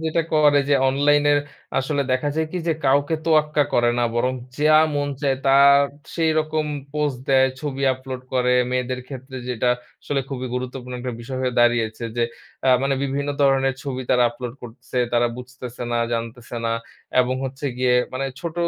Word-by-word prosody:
যেটা 160 +1 +1
করে 150 -2 +5
যে 145 - +4
অনলাইনের 145 +1 +3 0.4
আসলে 140 +2 0
দেখা 130 +3 +1
যায় 160 0 +1
কি 180 - -2
যে 165 - +4
কাউকে 145 +4 +3
তোয়াক্কা 150 -2 +3
করে 120 0 +4
না 120 - +2
বরং 125 +2 +1 0.3
যা 155 +1 +5 0.2
মন 145 0 0
চায় 135 -2 +1
তা 135 0 +6 0.6
সেইরকম 155 -1 +1 0.3
পোস্ট 150 -4 -1
দেয়, 130 -1 +5
ছবি 140 -2 -4
আপলোড 130 0 -7
করে। 125 0 +2 0.2
মেয়েদের 125 0 -1
ক্ষেত্রে 130 -1 -8
যেটা 125 0 0 0.3
আসলে 140 -1 -1
খুবই 130 -2 -4
গুরুত্বপূর্ণ 125 0 -5
একটা 125 0 -4
বিষয় 130 +2 -5
হয়ে 125 -1 -1
দাঁড়িয়েছে। 120 -1 +2
যে 120 - +2 0.4
অ্যা 130 - +4
মানে 135 0 +1
বিভিন্ন 140 +1 -2
ধরনের 135 -1 +3
ছবি 130 -2 -4
তারা 125 -1 +4
আপলোড 120 0 -6
করছে, 120 +1 -10 0.2
তারা 120 0 +3
বুঝতেছে 125 -1 -8
না, - - +1 0.2
জানতেছে 115 +1 -4
না। 115 - +1 0.5
এবং 125 +1 0
হচ্ছে 135 +2 -4
গিয়ে 125 -1 +3 0.2
মানে 130 +1 -2 0.2
ছোট 170 -2 -4
130 Hz, 170 wpm, -22 LUFS, 125-145 Hz, 0.6 s, তা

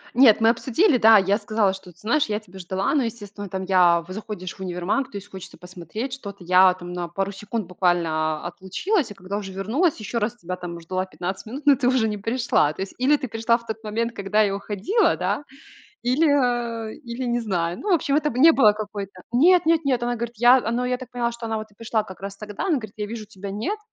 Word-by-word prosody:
Нет, 235 -4 +6
мы 225 - +6
обсудили, 250 - +2
да, 220 0 +8
я 195 +2 +2
сказала, 215 -4 +1
что, 190 -2 -11
ты 170 - -26
знаешь, 280 - +1
я 210 -1 -2
тебя 190 -3 -14
ждала, 190 +5 -1
но, 290 - +3
естественно, 205 -3 -6
там 190 +1 -4
я, 180 -3 +4
в 185 - -10
заходишь 205 -3 -6
в - - -22
универмаг, 185 +8 -2
то 200 - -7
есть 200 - -9
хочется 190 -2 -10
посмотреть 180 - -7
что-то. 200 -8 -8
Я 185 +1 +6
там 175 -1 -8
на 175 -1 -3
пару 195 +3 -3
секунд 210 +2 -4
буквально 165 -3 0
отлучилась, 200 - -1
а - - -9
когда 195 +2 -5
уже 195 -2 -6
вернулась, 235 - 0
ещё 225 +3 -3
раз 220 +2 -1
тебя 180 -4 -6
там 175 -1 -7
ждала 185 +3 -3
15 185 +3 -5
минут, 270 +6 -7
но 285 -1 +7
ты 250 -1 0
уже 250 -4 +3
не 210 - -2
пришла. 225 - +1
То 190 - -4
есть 195 - -9
или 285 +4 +4
ты 265 - -5
пришла 225 +1 +1
в 235 - -17
тот 220 0 -6
момент, 230 +2 -2
когда 205 +2 +2
я 200 -1 0
уходила, 205 - +1
да, - - -1 0.6
или, 260 +7 +3
э, 240 -5 0
или 245 -2 -6
не 240 0 0
знаю. 175 -6 -2
Ну 420 - -4
в - - +6
общем, 285 -3 0
это 300 0 +2
б 245 - -6
не 320 +5 +8
было 215 -9 +5
какой-то 200 -3 -7
Нет-нет-нет. 315 -3 +4
Она 240 0 0
говорит: 235 0 -5
"Я" 245 +3 +7
а, 230 - -1
ну 250 +1 0
я 250 0 0
так 255 -1 -10
поняла, 240 -1 -1
что 235 -1 -7
она 220 0 -1
вот 215 0 -7
и - - -25
пришла 220 0 -1
как 190 -2 -12
раз 200 0 -6
тогда. 210 - -5
Она 365 - +2
говорит: 215 -5 -8
"Я 210 -1 -3
вижу 225 -1 -6
тебя 200 -1 -9
нет, 315 - -3
215 Hz, 240 wpm, -23 LUFS, 190-245 Hz, 0.6 s, да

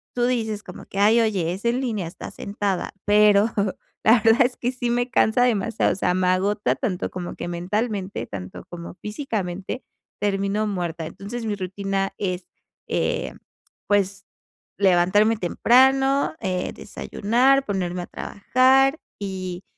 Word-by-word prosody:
tú 240 -1 +2
dices 220 -4 -1
como 180 - -10
que, - - -10
ay, 215 +3 +5
oye, 195 -7 +1
es 195 +5 -8
en 240 +2 +1
línea, 215 -9 -2
estás 170 - -9
sentada, 200 -2 -2
pero 210 0 +5 0.6
la 225 +1 +6
verdad 225 +4 +6
es 250 - -2
que 245 - -2
sí 245 -2 -3
me 245 +1 0
cansa 220 0 +3
demasiado, 225 -2 +1
o - - -1
sea, 180 -2 +1
me 185 0 +1
agota 200 +3 +1
tanto 200 -9 -2
como 180 -1 -6
que - - -5
mentalmente, 200 +3 -2
tanto 95 -2 -8
como 170 -1 -8
físicamente, 210 -3 -4 0.4
termino 200 +1 0
muerta. 175 -4 -3
Entonces, 225 +8 -6
mi 210 -2 -1
rutina 195 0 -2
es, 185 -2 -3 0.4
eh, - - -1 0.5
pues, 200 -1 +1 0.5
levantarme 195 +4 +4
temprano, 265 +8 +3
eh, 180 -1 -2
desayunar, 255 +6 +1
ponerme 180 -5 -2
a - - -5
trabajar 265 +7 +2 0.2
y 185 -2 -5
205 Hz, 145 wpm, -23 LUFS, 185-235 Hz, 0.6 s, la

